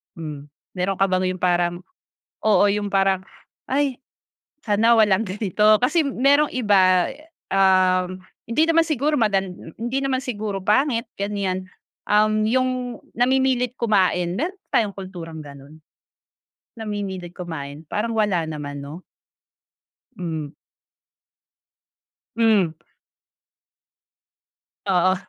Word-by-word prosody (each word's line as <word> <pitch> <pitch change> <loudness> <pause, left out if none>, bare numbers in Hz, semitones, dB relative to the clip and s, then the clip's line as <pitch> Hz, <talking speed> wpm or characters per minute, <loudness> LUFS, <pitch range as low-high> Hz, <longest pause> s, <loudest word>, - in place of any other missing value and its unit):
Hmm, 150 -4 -7 0.3
meron 190 +2 0
ka 195 - +4
bang 185 0 +1
'yung 185 - -13
parang, 175 -1 +1 0.7
oo, 205 -3 +5
'yung 205 0 -1
parang, 195 -1 +2 0.5
"ay 275 -1 0 0.7
sana 225 +2 +4
walang 210 -1 +4
ganito," 210 +2 +3
kasi 310 +6 +3
merong 280 +3 +3
iba, 190 -6 +4 0.4
um, 185 -1 +3 0.4
hindi 310 +7 +3
naman 330 0 +4
siguro 305 -1 0
madan 195 -4 +1
m 165 - -12
hindi 240 +4 -2
naman 270 -1 +1
siguro 210 -5 -3
pangit 240 +1 +2
ganiyan, 195 -2 -2 0.4
um, 215 +1 +3
'yung 255 +2 +2 0.5
namimilit 255 0 +2
kumain, 185 -5 +2
meron 355 - -2 0.2
ba - - +5
tayong 205 -3 -2
kulturang 175 -4 -8
gano'n? 140 +1 -13 1.0
Namimilit 200 -5 -5
kumain, 155 -4 -7
parang 225 +2 -1
wala 200 -6 +1
naman, 145 -2 -6
'no? 150 +5 -9 1.2
Mm. 160 -5 -4 1.9
Hmm. 220 -6 +4 2.2
Oo. 185 0 +3
200 Hz, 105 wpm, -22 LUFS, 180-230 Hz, 2.2 s, oo